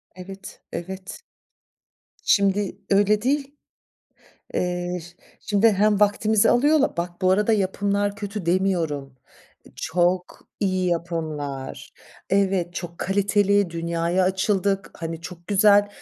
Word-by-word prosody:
Evet, 195 +1 -10
evet. 190 +2 -7 1.0
Şimdi 200 0 +2
öyle 205 +1 +3
değil. 280 +2 -1 1.0
Eee, 180 0 -1
şi 175 +2 -14 0.2
şimdi 210 +2 +3
hem 210 +1 +2
vaktimizi 210 +1 +3
alıyorlar 290 - +3
Bak, 175 +2 -4
bu 185 - +4
arada 210 +4 +3
yapımlar 200 0 0
kötü 200 -3 -5
demiyorum, 170 -7 0 0.6
çok 175 +2 -1
iyi 185 -2 +1
yapımlar, 155 -6 -4 0.4
evet, 190 -3 +1
çok 170 -2 -6
kaliteli, 200 -1 +2
dünyaya 170 +2 0
açıldık, 195 +1 0
hani, 165 -1 -5
çok 175 0 -10
güzel, 205 0 +5
190 Hz, 105 wpm, -23 LUFS, 175-205 Hz, 1.0 s, güzel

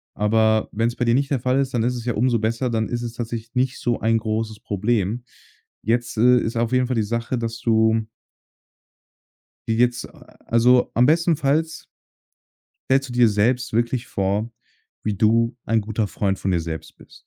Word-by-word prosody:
Aber 110 +1 +2
wenn's 115 +2 -1
bei 125 - -1
dir 115 - +3
nicht 140 +1 0
der 135 - +1
Fall 130 +2 +1
ist, 135 -1 -1
dann 115 - +1
ist 125 +2 0
es 120 -1 -6
ja 120 - 0
umso 120 +1 +1
besser. 115 +3 -1
Dann 110 -1 -1
ist 120 0 -3
es 120 -1 -5
tatsächlich 115 -1 -6
nicht 130 0 0
so 120 -2 -1
ein 115 0 +2
großes 110 -1 -3
Problem. 105 +2 -1 0.6
Jetzt, 120 +2 -1
äh, 125 +3 +5
ist 115 0 -3
auf 115 +1 0
jeden 125 -1 +2
Fall 130 - -1
die 110 - +1
Sache, 115 +3 -2
dass 115 -1 -4
du 110 -1 +2 1.6
wie 110 - +1
geht's 120 +1 +1
a - - -18
also, 125 +2 +4
am 120 - +4
bestenfalls 160 0 +1 1.1
stellst 135 +1 +2
du - - -6
dir 120 -1 +4
selbst 115 +4 0
wirklich 120 +1 0
vor, 100 +4 -1 0.5
wie 105 - -1
du 115 +3 +2
ein 115 -1 +1
guter 110 0 -2
Freund 100 -1 -2
von 95 - -1
dir 85 - +1
selbst 80 0 -7
bist. - - -18
115 Hz, 190 wpm, -22 LUFS, 110-125 Hz, 1.6 s, äh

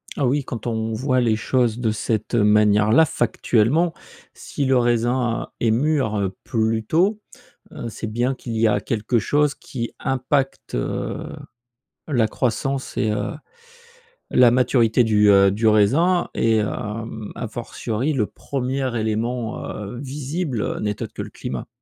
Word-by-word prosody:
Oh, 140 - -1
oui, 135 +3 +1
quand 120 -3 -6
on 110 -1 -2
voit 130 +3 +1
les 115 -3 +2
choses 120 0 0
de 115 -3 +1
cette 110 +1 -2
manière 105 -1 +4
là, 160 +8 +6
factuellement, 130 +5 +1 0.4
si 140 - -4
le 130 -1 +3
raisin 120 0 +1
est 115 - +2
mûr 110 -6 +1
plus 110 -1 0
tôt, 190 - +2 0.5
heu, 115 - -6
c'est 110 - -6
bien 120 +5 0
qu'il 120 -3 -6
y 110 0 +3
a 105 - +1
quelque 115 +1 0
chose 145 +6 +1
qui 120 -3 -6
impacte, 135 +1 -1
heu, - - -3 0.8
la 120 -7 +2
croissance 130 +4 -2
et 110 - +1
heu, 105 - -2 1.0
la 125 -1 +6
maturité 120 -1 +3
du, 105 -2 +4
heu, 100 -1 +6
du 110 +3 +1
raisin 145 - +3
et 115 -1 +2
hem, 110 0 -4
à 120 - -4
fortiori, 120 +4 -3
le 120 -7 +1
1er 130 +1 -3
élément, 110 +2 -2
heu, 105 +4 -6
visible 140 -1 -3
n'est 105 -1 -3
autre - - -7
que - - -5
le - - -6
climat. 65 -2 -6
120 Hz, 150 wpm, -22 LUFS, 110-130 Hz, 1.0 s, là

